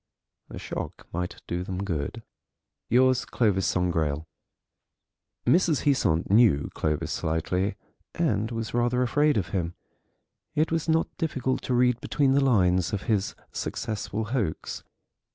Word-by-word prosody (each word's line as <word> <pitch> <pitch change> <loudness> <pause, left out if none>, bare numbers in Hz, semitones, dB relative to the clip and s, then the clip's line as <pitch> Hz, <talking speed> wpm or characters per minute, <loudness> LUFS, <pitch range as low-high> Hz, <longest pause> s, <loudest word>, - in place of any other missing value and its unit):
The - - -8
shock - - -6
might 90 +1 -4
do 90 +1 -3
them 95 +1 -4
good. 80 -7 -3 0.7
"Yours, 130 +1 +4
"CLOVIS 100 -5 +1
SANGRAIL." 80 -4 0 1.2
Mrs. 170 -4 +3
Heasant 95 - +2
knew 105 -10 +4
Clovis 75 -1 -1
slightly, 90 +5 -1 0.4
and 110 +2 +1
was 115 -2 -4
rather 120 +1 +2
afraid 145 +3 +2
of 100 - -1
him. 85 -3 -2 0.8
It 155 +2 +2
was 165 0 -1
not 160 +1 +1
difficult 135 -5 -1
to 125 - 0
read 125 -1 +3
between 140 -2 +1
the 140 +1 +4
lines 90 -8 +3
of 100 - -2
his 105 -4 0 0.2
successful 110 0 -3
hoax. 110 -12 -2
110 Hz, 130 wpm, -27 LUFS, 90-130 Hz, 1.2 s, Yours